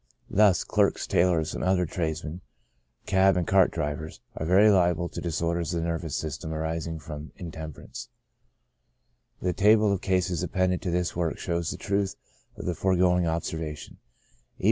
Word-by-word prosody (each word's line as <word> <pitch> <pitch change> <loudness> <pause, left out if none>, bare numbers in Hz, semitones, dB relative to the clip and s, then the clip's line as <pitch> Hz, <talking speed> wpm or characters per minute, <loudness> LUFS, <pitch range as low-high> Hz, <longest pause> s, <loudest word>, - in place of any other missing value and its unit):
Thus 100 -2 +4
clerks, - - +1
tailors, 85 -3 +2
and - - -4
other 90 -1 +2
trades 80 -1 -3
men, 80 +4 -6 0.6
cab 95 -1 +4
and 90 - 0
cart 95 +1 +4
drivers, 75 +2 -4 0.2
are 80 - -3
very 100 +4 +6
liable 90 -2 +2
to - - -6
disorders 85 0 -1
of - - 0
the - - -2
nervous 85 -3 -3
system 80 0 -4
arising 80 +1 -3
from 75 0 -8
intemperance 80 -4 -8 0.6
\ - - -46
the 90 -1 +1
table 105 +1 +4
of 95 - -2
cases 90 -3 0
appended 95 -1 0
to - - -3
this 90 0 -1
work 85 -2 -1
shows 85 -2 -2
the - - -4
truth 100 -1 -1 0.4
of - - -7
the 90 - 0
foregoing 90 -1 +2
observation: 80 -2 -4
E. - - -38
85 Hz, 165 wpm, -27 LUFS, 80-90 Hz, 0.6 s, very